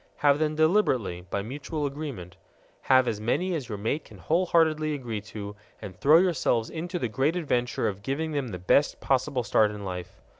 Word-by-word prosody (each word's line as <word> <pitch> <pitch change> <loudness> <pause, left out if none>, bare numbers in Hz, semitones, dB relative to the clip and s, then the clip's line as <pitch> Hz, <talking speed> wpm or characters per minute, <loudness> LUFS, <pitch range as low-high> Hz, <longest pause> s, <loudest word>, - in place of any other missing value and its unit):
Have 145 0 +3
them 155 -1 0
deliberately, 130 - +1
by 100 - -2
mutual 145 +6 -4
agreement. 140 - -6 0.5
Have 130 -1 +6
as 105 -2 -2
many 180 +12 0
as 140 -8 -4
your 105 - -4
mate 115 +9 -2
can - - -14
wholeheartedly 160 -3 +2
agree 115 -6 -4
to, 105 -1 -8 0.2
and 95 -3 -8
throw 150 - +6
yourselves 155 -10 +1
into 175 +3 -4
the 140 - -1
great 135 +8 0
adventure 125 -8 0
of 100 -1 -4
giving 145 +8 -2
them 140 -3 -2
the 95 -6 -5
best 90 +11 +2
possible 135 -1 0
start 110 -2 +3
in 105 -1 -7
life. 90 +1 -6
135 Hz, 185 wpm, -27 LUFS, 105-155 Hz, 0.5 s, Have